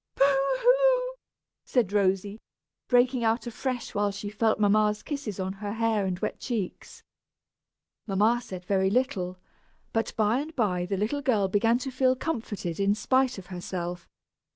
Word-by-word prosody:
"Boo - - +4 0.3
hoo!" - - +3 0.5
said 225 -6 0
Rosy, 200 +1 +1 0.5
breaking 245 0 +3
out 225 +2 +1
afresh 245 +1 -4
when 205 0 +1
she 200 +1 -6
felt 220 +1 +1
mamma's 210 0 +3
kisses 275 - -5
on 190 0 -2
her 205 -1 -3
hair 220 -3 +1
and 180 -1 -2
wet - - -3
cheeks. 220 -8 -5 1.0
Mamma 215 +4 +2
said 180 -3 -8
very 190 0 +2
little, 195 -6 0 0.6
but 225 -1 0
by 220 +3 +2
and 310 +3 -6
by 180 -7 0
the 195 0 -1
little 225 +9 -1
girl 220 -8 +2
began 225 +4 +2
to 265 +1 -5
feel 255 0 +2
comforted, 220 - -4
in 200 +1 +3
spite 255 +2 +1
of 190 - -9
herself. 175 -1 -5
215 Hz, 155 wpm, -27 LUFS, 195-250 Hz, 1.0 s, Boo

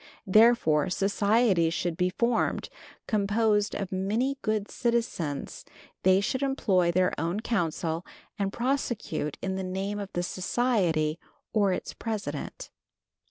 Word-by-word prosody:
Therefore, 190 -6 +4
societies 200 -3 +2
should 175 -2 -1
be 180 +2 +1
formed, 235 +5 0 0.4
composed 210 0 +1
of 195 0 -4
many 220 +9 0
good 215 -2 -1
citizens; 225 - -2 0.4
they 185 +1 +5
should 230 +7 -1
employ 195 -11 +2
their 185 +1 +2
own 170 +7 -1
counsel, 170 -6 -1 0.4
and 195 -1 0
prosecute 240 - -2
in 190 0 -1
the 190 - -3
name 195 +3 -3
of 200 -1 -6
the 175 - -1
society 180 -6 0 0.3
or 205 -3 +3
its 180 - -3
president. 220 -3 -5
200 Hz, 120 wpm, -28 LUFS, 180-225 Hz, 0.4 s, they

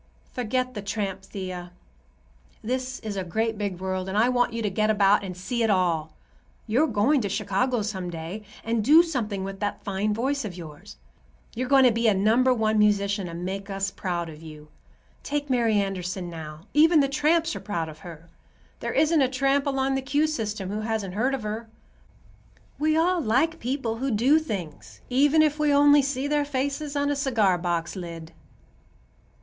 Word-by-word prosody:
"Forget 255 +1 -1
the 210 - -5
tramp, 200 -1 -3
Thea. 185 -2 -6 0.9
This 255 +3 -3
is 215 -2 -5
a 190 - -2
great 220 +6 -1
big 200 -4 -3
world, 185 0 -3
and 195 - -2
I 230 +3 +4
want 245 -1 +2
you 230 0 -3
to 210 - +1
get 215 +3 +1
about 205 -1 +4
and 185 -2 -6
see 235 +6 -3
it 225 - +2
all. 170 -5 +1 0.5
You're 250 +8 +2
going 250 +5 +2
to 205 - -2
Chicago 215 +5 0
some 190 -4 -4
day, 170 +5 -6 0.2
and 225 -1 0
do 310 +8 +7
something 225 - -3
with 195 0 -6
that 205 0 -3
fine 200 +1 -1
voice 265 +6 -1
of 190 -5 -6
yours. 150 - -11 0.6
You're 250 +2 -3
going 275 -1 +6
to 250 - +6
be 230 +1 +1
a 210 - +4
number 225 +6 +3
one 220 -3 +1
musician 200 -2 +2
and 170 +1 -6
make 195 +2 -5
us 195 0 -2
proud 175 -4 -3
of 155 -1 -11
you. 155 -1 -11 0.5
Take 290 -1 -3
Mary 235 -3 +2
Anderson, 185 -2 -2
now; 155 -2 -8
even 315 +2 +6
the 275 - +3
tramps 315 +4 +1
are - - -4
proud 170 -6 -3
of 155 -1 -10
her. 165 -2 -11 0.5
There - - -3
isn't 315 -1 +3
a 265 - +4
tramp 275 +2 +1
along 270 -1 0
the 270 - 0
'Q' 285 +3 +1
system 215 -10 -3
who 210 - -2
hasn't 215 -4 -3
heard 250 +7 +1
of 255 - -7
her. 220 +2 -5 1.1
We 310 +1 +2
all 350 +2 +2
like 295 +7 +1
people 245 -3 -2
who 270 +3 -2
do 255 +7 +4
things, 195 - -7
even 290 +4 +4
if 305 0 +1
we 300 -1 +3
only 290 0 +6
see 275 0 -2
their 295 0 +1
faces 285 +1 -3
on 285 0 +1
a - - 0
cigar 225 -10 +2
box 170 0 -2
lid." 165 -3 -7
220 Hz, 190 wpm, -25 LUFS, 190-270 Hz, 1.1 s, do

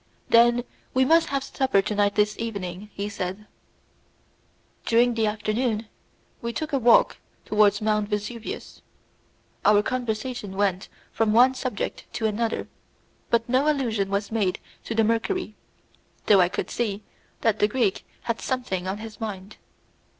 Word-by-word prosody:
"Then 240 +1 +5 0.3
we 260 0 +4
must 330 +4 +4
have 275 -1 -1
supper 265 -7 +1
together 205 0 +2
this 210 0 +2
evening," 200 -3 -5
he 200 +1 -4
said. 200 0 -5 1.4
During 240 +1 +3
the 225 -1 +1
afternoon 215 +1 -1 0.5
we 235 0 -3
took 310 +5 -4
a 275 - +3
walk 240 -1 +5 0.3
towards 210 -1 +3
Mount 210 -1 +1
Vesuvius. 215 +2 -5 0.8
Our 210 0 +5
conversation 240 -3 -3
went 195 -2 0 0.2
from 220 -1 +1
one 250 +3 +6
subject 255 -4 -4
to 225 - -2
another, 220 +1 -1 0.6
but 230 -1 +2
no 265 +5 +3
allusion 225 -9 -1
was 200 +1 -2
made 205 -5 0 0.3
to 230 - -3
the 225 - +4
mercury, 230 - 0 0.7
though 200 -3 +6
I 175 - +3
could - - -4
see 215 -3 -2 0.4
that 220 -2 +2
the 210 - +4
Greek 215 -3 0 0.2
had 230 -1 -2
something 220 -9 -2
on 190 +2 -2
his 220 0 -9
mind. 200 -2 -6
220 Hz, 145 wpm, -25 LUFS, 205-240 Hz, 1.4 s, one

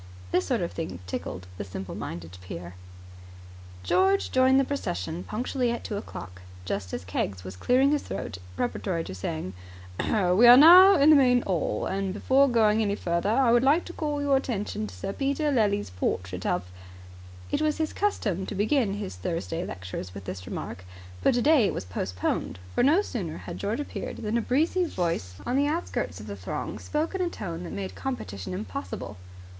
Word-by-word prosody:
This 185 - +1
sort 245 -6 +1
of 170 - -2
thing 160 - -5
tickled 90 0 -5
the - - -2
simple 95 -1 -7
minded 85 +1 -6
peer. 90 -1 -8 1.1
George 190 - +2
joined 260 +1 +5
the - - +4
procession 170 - -3
punctually 245 +2 -1
at 235 - -4
two 210 - -4
o'clock, 95 - -8 0.2
just 95 0 -3
as 85 - -5
Keggs 95 +1 -3
was 95 0 -7
clearing 255 - +3
his 295 - +2
throat 90 - -5 0.2
preparatory 185 -8 -2
to 95 - -7
saying, 90 0 -4 0.5
"We 200 +2 +4
are 245 +1 +11
now 365 +7 +10
in 300 -1 +6
the - - +8
main 250 -3 +5
'all, 180 -4 -1
and 195 0 -2
before 270 +5 +4
going 220 -2 +3
any 200 -2 +1
further 170 +1 -1
I 235 +2 +4
would 240 0 +5
like 285 +7 +3
to 350 - -8
call 295 -3 -2
your 280 -1 +4
attention 210 - -3
to 95 - -11
Sir 90 - -4
Peter 280 +2 0
Lely's 205 - +1
portrait 90 0 -2
of 90 - 0 0.5
" 90 0 -17
It - - 0
was 310 -1 +1
his 315 -1 -1
custom 205 - -1
to - - -5
begin 215 +1 +2
his 205 - -5
Thursday 165 - -3
lectures 95 - -6
with 100 -1 -8
this 90 -1 -6
remark, 90 - -6 0.4
but - - +3
today 270 0 +5
it - - -2
was - - -4
postponed; 90 0 -2 0.2
for, - - +2
no 315 +10 +4
sooner 180 - -4
had 170 - -8
George 210 +6 -2
appeared, - - -5
than 215 +1 -2
a 235 - +2
breezy 320 +10 +1
voice 165 - -2
on 245 - -1
the 285 +1 +3
outskirts 325 +4 -2
of - - -9
the - - -6
throng - - -5
spoke 310 +4 -2
in 380 - -2
a 355 - +1
tone 175 - -6
that - - -7
made 95 -1 -5
competition 100 -4 -5
impossible. 95 0 -6
195 Hz, 190 wpm, -27 LUFS, -, 1.1 s, are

